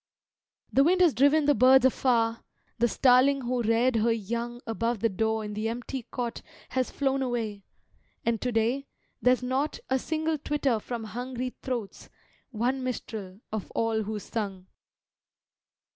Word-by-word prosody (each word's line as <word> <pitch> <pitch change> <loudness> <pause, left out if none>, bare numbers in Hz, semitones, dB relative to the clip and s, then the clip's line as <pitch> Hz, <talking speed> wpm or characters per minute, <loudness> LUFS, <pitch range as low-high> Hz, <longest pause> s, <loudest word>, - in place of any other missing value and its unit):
The 270 - +5
wind 360 +5 +3
has 340 -5 +5
driven 285 +3 +4
the 290 - +5
birds 260 -1 +6
afar, 235 -3 +2 0.4
The 240 - +4
starling 265 +3 +4
who 245 0 -1
reared 230 +2 +2
her 225 +2 +3
young 235 +2 -3
Above 230 +1 -1
the 230 - +3
door 220 +2 -1
in 210 - -5
the 215 +2 -2
empty 245 +1 -5
cot 240 -2 -4 0.3
Has 255 -1 0
flown 270 -1 0
away, 225 -6 -3 0.6
and 230 -2 0
to 250 - -1
day 240 +5 0 0.3
there's 250 0 +3
not 265 +4 -1
A 265 - +3
single 315 +1 -1
twitter 280 -5 0
from 235 +1 -5
hungry 250 +3 -4
throats, 240 -6 -5 0.4
One 250 +2 -1
minstrel, 220 -6 -5
of 215 -2 -4
all 225 -1 +1
who 215 +1 -3
sung. 200 -3 -4
240 Hz, 150 wpm, -28 LUFS, 225-260 Hz, 0.6 s, birds